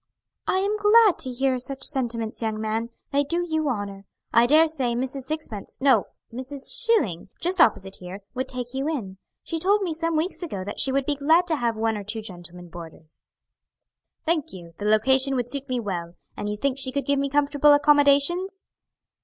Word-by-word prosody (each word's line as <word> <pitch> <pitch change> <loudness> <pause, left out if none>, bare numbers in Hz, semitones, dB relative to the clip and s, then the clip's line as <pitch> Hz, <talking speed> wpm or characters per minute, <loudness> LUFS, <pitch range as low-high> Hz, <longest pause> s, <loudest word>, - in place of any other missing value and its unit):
"I'm 400 +3 +1
glad 420 -1 +5
to 260 - 0
hear 260 +1 0
such 265 +2 -2
sentiments, 235 -6 0
young 220 -1 -2
man; 220 +2 -2 0.2
they 285 0 +2
do 340 +5 -1
you 315 -2 0
honor. 200 -4 -5 0.3
I 235 +1 +5
daresay 305 -5 +3
Mrs. 260 +2 -3
Sixpence, 285 -10 -4
no, 265 -6 +3 0.3
Mrs. 260 +3 -2
Schilling, 395 - +1
just 355 +1 +1
opposite 190 - +2
here, 185 +2 -9
would 260 +1 -3
take 250 -1 -3
you 270 +3 -2
in. 195 -11 -5 0.2
She 330 - -4
told 400 +4 +2
me 345 -4 -2
some 330 +1 -2
weeks 345 +5 -2
ago 205 - -5
that 205 - -6
she 270 - +2
would 275 0 0
be 290 0 -1
glad 320 +5 +3
to 320 - +2
have 235 -5 -1
one 225 0 0
or 205 - -6
two 215 +2 -5
gentlemen 175 -2 -8
boarders." 165 -2 -10 1.0
"Thank 325 -2 0
you, 170 -3 -11
the 205 - -4
location 265 +6 +3
would 245 -1 -2
suit 280 -1 -4
me 250 -1 -1
well; 175 -6 -5 0.2
and 205 - -4
you 210 - -3
think 275 +3 -1
she 260 -1 0
could 280 +1 -2
give 280 -1 +1
me 280 0 -1
comfortable 290 +1 +3
accommodations?" 290 +6 +3
265 Hz, 190 wpm, -24 LUFS, 215-310 Hz, 1.0 s, glad